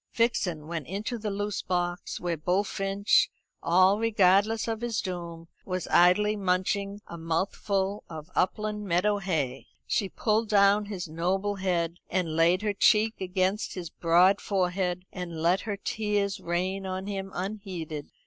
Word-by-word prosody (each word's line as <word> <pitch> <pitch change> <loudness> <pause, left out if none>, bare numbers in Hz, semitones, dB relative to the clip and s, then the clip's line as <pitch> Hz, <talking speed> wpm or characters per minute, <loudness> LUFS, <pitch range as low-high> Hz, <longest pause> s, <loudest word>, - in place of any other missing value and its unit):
Vixen 185 -9 0
went 160 -3 -5
into 215 +6 -4
the 210 0 -3
loose 205 0 -2
box, 175 -1 -2
where 175 -1 -1
Bullfinch, 195 +4 +1 0.3
all 185 +4 +4
regardless 215 0 +3
of 225 -1 -2
his 235 -3 -1
doom, 170 -3 -5 0.2
was 185 -2 -3
idly 195 +5 +5
munching 200 +1 -1
a 170 - -9
mouthful 190 +4 -1
of 160 +1 -9
upland 210 +2 0
meadow 200 +4 +2
hay. 150 -9 -2 0.2
She 195 - 0
pulled 220 +2 0
down 205 0 +4
his 195 -4 -5
noble 190 +5 -1
head, 175 -3 -1
and 175 -4 -1
laid 170 +4 +3
her 210 -1 0
cheek 215 +2 +3
against 190 +2 -1
his 175 -3 -6
broad 180 +4 +4
forehead, 180 -2 -1
and 175 -3 -5
let 175 +4 +2
her 200 - -2
tears 205 -1 -1
rain 185 +3 -2
on 185 0 -4
him 195 -1 -4
unheeded. 180 -6 -5
190 Hz, 145 wpm, -28 LUFS, 175-205 Hz, 0.3 s, idly